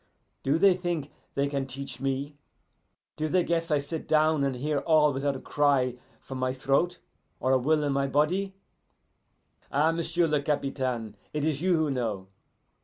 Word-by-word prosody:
Do 140 +4 +2
they 195 +2 +6
think 175 -5 -3 0.2
they 140 0 +1
can 140 -1 -2
teach 135 +1 -6
me? 135 +2 -2 0.8
Do 155 0 -1
they 180 +3 +2
guess 165 0 -1
I 150 - +3
sit 150 +3 -5
down 155 -1 +3
and 135 -2 0
hear 145 +3 -1
all 150 -1 +4
without 135 +1 -1
a - - -5
cry 140 -4 +2 0.3
from 130 -1 -7
my 130 0 0
throat 140 +7 +1 0.4
or 130 - +1
a 130 - +4
will 150 +4 +2
in 145 -1 0
my 140 0 +1
body? 180 +8 +1 1.2
Ah, 150 +4 +3
m'sieu' 170 +1 0
le 150 -2 +1
Capitaine, 130 -6 -2 0.2
it 150 -1 -1
is 155 -2 0
you 180 -1 +3
who 155 -2 +1
know. 110 -7 -3
145 Hz, 175 wpm, -28 LUFS, 135-160 Hz, 1.2 s, they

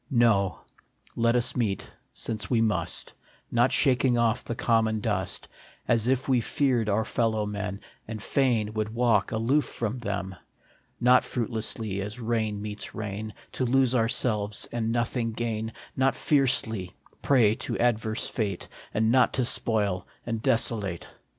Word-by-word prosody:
No; 110 - +3 0.5
let 115 +1 +2
us 120 0 +1
meet, 105 -6 -2 0.2
since 110 -3 -4
meet - - -11
we 115 -2 +3
must, 110 -2 -1 0.4
Not 120 +2 +3
shaking 130 -3 +3
off 115 -1 +2
the 120 - -4
common 110 -2 +2
dust, 100 -4 -2 0.4
As 115 -1 +2
if 130 0 +1
we 130 -3 +3
feared 120 -3 +1
our 105 +2 +1
fellow 110 -2 0
men, 100 -1 -4 0.3
And 110 0 -5
fain 115 -3 +1
would 110 0 -1
walk 115 -4 +2
aloof 120 +7 +2
from 115 +2 -3
them; 100 -4 -3 0.6
Not 125 +1 +5
fruitlessly, 110 -4 -3
as 105 +4 -5
rain 110 -3 -1
meets 105 0 -6
rain, 105 0 -5 0.2
To - - -2
lose 130 0 +3
ourselves 110 -3 +1
and 115 -1 -1
nothing 120 -1 -1
gain; 110 -1 -2 0.2
Not 135 +1 +2
fiercely, 120 - +1 0.3
prey 120 -7 +4
to - - -3
adverse 110 -2 0
fate, 100 -6 -3 0.3
And 110 +1 +3
not 130 0 +4
to 130 - +1
spoil 100 -6 +1 0.2
and 115 -2 -3
desolate. 105 -7 0
115 Hz, 145 wpm, -27 LUFS, 105-120 Hz, 0.6 s, Not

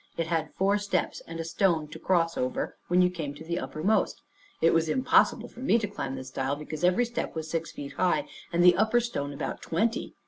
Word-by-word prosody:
It 165 - 0
had 160 -2 -2
four 200 +2 +2
steps, 200 -3 -1
and 165 0 -7
a - - -1
stone 165 -1 +1
to - - -9
cross 170 -3 +1
over 125 0 -2
when 180 +1 +4
you 180 - +3
come 155 -5 -5
to 155 - -10
the 170 +2 -2
uppermost. 155 +11 0 0.4
It 165 - +4
was 165 -1 +2
impossible 260 +11 +3
for - - -15
me 255 -2 +3
to 215 -3 -1
climb 135 -9 -4
this 130 0 -7
stile, 135 +1 -1
because 150 +1 -7
every 180 +7 +4
step 240 -6 -4
was 160 -1 -4
six 165 -1 -2
feet 140 -1 -7
high, 185 - +1 0.2
and 170 +1 +2
the 180 0 +8
upper 220 +2 +3
stone 185 -12 -3
about 140 - -4
twenty. 225 +8 -1
165 Hz, 220 wpm, -28 LUFS, 155-195 Hz, 0.4 s, the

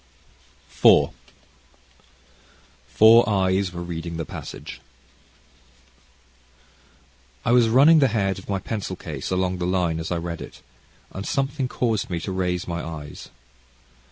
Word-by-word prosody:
CHAPTER - - +6
IV - - +6 1.8
Four 110 - +6
Eyes 95 -1 +1
Were 85 0 -6
Reading 85 -1 -6
the 80 - -4
Passage - - -9 2.6
I - - +2
was 120 -2 +5
running 145 +7 +6
the 135 - +4
head 100 -4 -1
of 95 - -15
my 100 - 0
pencil 95 -1 -5
case 80 -7 -6
along 95 0 -1
the 90 - -1
line 90 -3 0
as 80 - -5
I 90 - 0
read 85 0 -5
it, - - -11 0.5
and 95 - -6
something 135 +3 -1
caused 115 -5 -1
me 85 -2 -2
to 95 - -5
raise 90 -1 -2
my 85 0 -4
eyes. 75 -3 -8
95 Hz, 135 wpm, -23 LUFS, 85-110 Hz, 2.6 s, CHAPTER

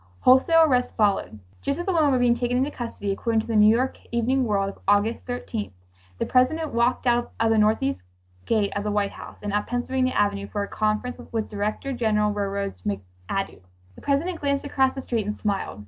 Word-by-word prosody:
Wholesale 320 +6 +6
arrests 250 -5 +2
followed. 200 - +1 0.2
Just 280 +1 -1
as 345 - -4
the 385 - 0
women 315 -4 +4
were 260 - +3
being 245 -1 +4
taken 245 +1 -1
into 270 +3 +1
custody, 230 -6 -4
according 225 +3 0
to - - -10
the 230 - -2
New 210 0 +7
York 255 +3 0
Evening 250 +3 +1
World 200 -3 +1
of - - -12
August 205 +5 +2
13th, 245 - -4 0.4
"the - - -1
President 305 +5 +2
walked 235 +2 +1
out 240 -1 +1
of 225 0 +3
the 225 - +3
northeast 210 - +2 0.5
gate 215 -3 +1
of 205 - -1
the 210 - -1
White 205 -1 0
House - - -11
and 205 -1 -3
up 205 0 0
Pennsylvania 255 +1 0
Avenue 200 -1 0
for 205 -1 -3
a - - -5
conference 215 +4 -1
with 225 -2 -2
Director 215 +6 -3
General 215 -3 +1
of - - -5
Railroads 200 - -3
McAdoo. 95 - -4 0.3
The - - -15
President 325 +5 -1
glanced 280 0 0
across 265 -2 +1
the 270 - -5
street 225 -5 -2
and 210 - -3
smiled." 200 - -2
225 Hz, 210 wpm, -24 LUFS, 205-255 Hz, 0.5 s, New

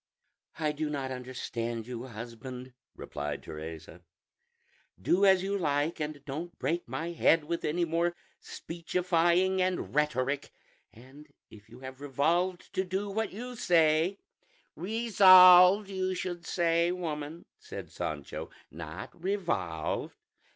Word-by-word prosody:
"I 155 -2 0
do 150 +1 -3
not 135 -3 -3
understand 120 -3 -4
you, 125 +1 -6
husband," 125 +2 -8 0.2
replied 70 0 -5
Teresa; 80 +2 -9 1.0
"do 185 - +3
as 190 -1 +5
you 200 +1 -1
like, 150 -2 0
and 150 -2 -5
don't 160 +5 -6
break 170 +2 -2
my 155 +8 -4
head 165 -1 +3
with 170 +2 -3
any 170 +3 0
more 170 +1 0 0.2
speechifying 175 +2 0
and 185 0 -1
rhetoric; 140 -2 0 0.4
and 135 +6 -15 0.2
if 105 -1 -15
you 120 +3 -14
have 130 +1 -9
revolved 170 +6 0
to 190 - 0
do 190 +2 -3
what 220 0 -2
you 245 +5 -7
say 165 -1 +3 0.3
" - - -37
"Resolved, 190 -3 +8
you 185 -1 -2
should 175 -2 -5
say, 170 0 +2
woman," 160 -2 -5
said - - -9
Sancho, 75 -2 -5 0.2
"not 85 - -8
revolved." 130 - -2
160 Hz, 125 wpm, -30 LUFS, 130-180 Hz, 1.0 s, Resolved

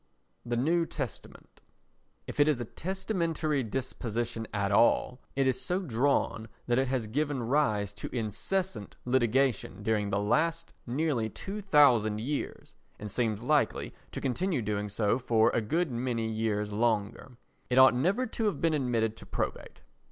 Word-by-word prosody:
The 120 0 -2
New 165 +6 +2
Testament 140 -7 -7 0.6
If - - -8
it 145 - +6
is 150 -5 +2
a 120 - -3
testamentary 170 - -2
disposition 115 -1 -3
at 100 -1 -1
all, 120 +4 +3
it 135 0 +2
is 130 -1 +1
so 180 +1 -1
drawn 130 - 0 0.2
that 120 +1 +2
it 135 - +1
has 125 -3 -1
given 140 +3 -1
rise 110 -6 +1
to - - -4
incessant 120 - -2
litigation 125 -5 +1
during 105 -1 +1
the 100 - 0
last 165 +11 0
nearly 125 -3 0
two 200 - -6
thousand 125 - +4
years 140 +6 -4 0.2
and 105 -1 -7
seems 110 -2 -1
likely 150 +2 +1 0.2
to - - -5
continue 140 - -1
doing 105 0 -2
so 105 +3 +1
for 115 -2 +3
a - - +1
good 160 +8 0
many 120 -2 -1
years 110 -2 -1
longer. 115 +2 -1 0.3
It 125 - +1
ought 130 0 +8
never 190 - +1
to 225 -1 -3
have 205 - 0
been 165 -2 +2
admitted 120 -6 0
to - - -12
probate. - - -4
125 Hz, 155 wpm, -29 LUFS, 110-150 Hz, 0.6 s, ought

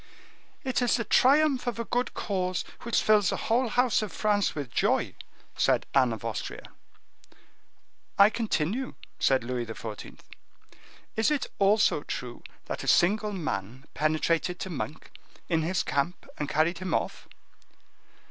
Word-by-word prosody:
"It 260 -2 0
is 245 - +3
the 230 - -1
triumph 270 +2 +4
of 240 - -1
a 230 - -3
good 245 +2 -1
cause 185 -3 -2 0.2
which 235 - 0
fills 210 -3 +4
the - - -1
whole 240 +3 +1
house 245 +1 +2
of 215 - -4
France 205 -2 +1
with 140 -5 -5
joy," - - +1 0.4
said - - +2
Anne 130 -3 +4
of 115 -1 -6
Austria. 115 -2 -4 1.5
"I 200 +2 +7
continue," 225 - -1 0.2
said 135 -2 +3
Louis 120 -1 -3
XIV.: 110 - -8 1.0
"Is 220 +4 +2
it 300 -3 0
also 200 -5 +4
true 125 -4 -6 0.2
that - - -5
a - - -7
single 210 +4 +3
man 130 - -4
penetrated 155 +4 0
to 190 - -4
Monk, 155 0 -6 0.4
in 165 -2 +1
his 175 +2 0
camp, 145 +6 -2
and 150 -1 -2
carried 165 +3 +1
him 185 -3 -1
off?" - - -3
185 Hz, 145 wpm, -28 LUFS, 145-225 Hz, 1.5 s, I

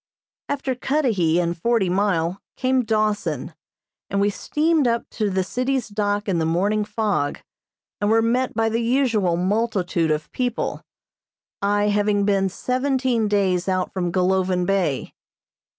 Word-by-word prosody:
After 280 -2 -1
Cudahy 235 - +1
and 170 -1 0
Forty 225 +3 +1
Mile, 180 -1 0 0.2
came 260 0 +2
Dawson, 210 - -1 0.6
and 200 - 0
we 205 +1 +2
steamed 305 +5 +1
up 235 0 0
to 215 -2 -1
the 190 -1 0
city's 255 +3 -1
dock 205 0 -1
in 180 -4 +1
the 160 - 0
morning 200 +6 +1
fog, 210 -8 -1 0.6
and 205 - +1
were 225 +1 +4
met 245 +2 0
by 225 0 +2
the 225 +1 0
usual 230 -8 +1
multitude 185 -3 0
of 150 0 -2
people, 245 -2 -2 0.8
I 205 +1 +2
having 205 0 +2
been 195 -1 +2
seventeen 255 0 0
days 190 -3 +1
out 185 -1 -1
from 175 -2 -1
Golovin 185 0 +1
Bay. 185 -8 0
205 Hz, 140 wpm, -22 LUFS, 185-235 Hz, 0.8 s, were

